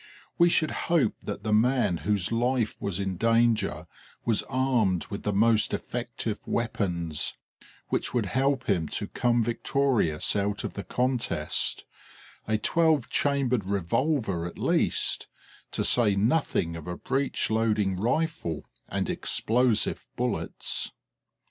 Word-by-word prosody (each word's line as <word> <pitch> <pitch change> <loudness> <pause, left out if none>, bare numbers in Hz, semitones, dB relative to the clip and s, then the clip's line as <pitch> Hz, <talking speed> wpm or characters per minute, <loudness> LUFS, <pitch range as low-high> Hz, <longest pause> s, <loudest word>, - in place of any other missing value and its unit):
We 170 0 +6
should 155 -2 +2 0.2
hope 160 -10 +3
that - - -6
the 110 0 0
man 120 -4 +3
whose 100 0 0
life 120 0 +1
was 100 -2 -2
in 95 -2 -2
danger 115 +1 +2 0.4
was 115 -3 +2
armed 125 -9 +1
with 100 - -4
the 105 - -1
most 110 +1 +3
effective 120 -3 -4
weapons, 90 -9 -1 0.5
which - - -1
would 120 -4 0
help 135 +6 0
him 90 -6 +1
to - - -3
come 120 -1 +1
victorious 120 - +1
out 100 0 -1
of - - -4
the 100 - -5
contest: 125 +1 -1 0.6
a 110 0 +2
twelve 160 +2 +2
chambered 130 -7 +1
revolver 100 - 0
at 85 - -10
least, - - +1 0.4
to - - -1
say 110 -5 +4
nothing 100 - +1
of 80 -1 -8
a 90 -1 -4
breech 135 -3 -1
loading 110 -3 +1
rifle 120 - -1 0.2
and - - -1
explosive 120 -1 +1
bullets! - - -2
115 Hz, 130 wpm, -27 LUFS, 100-130 Hz, 0.6 s, We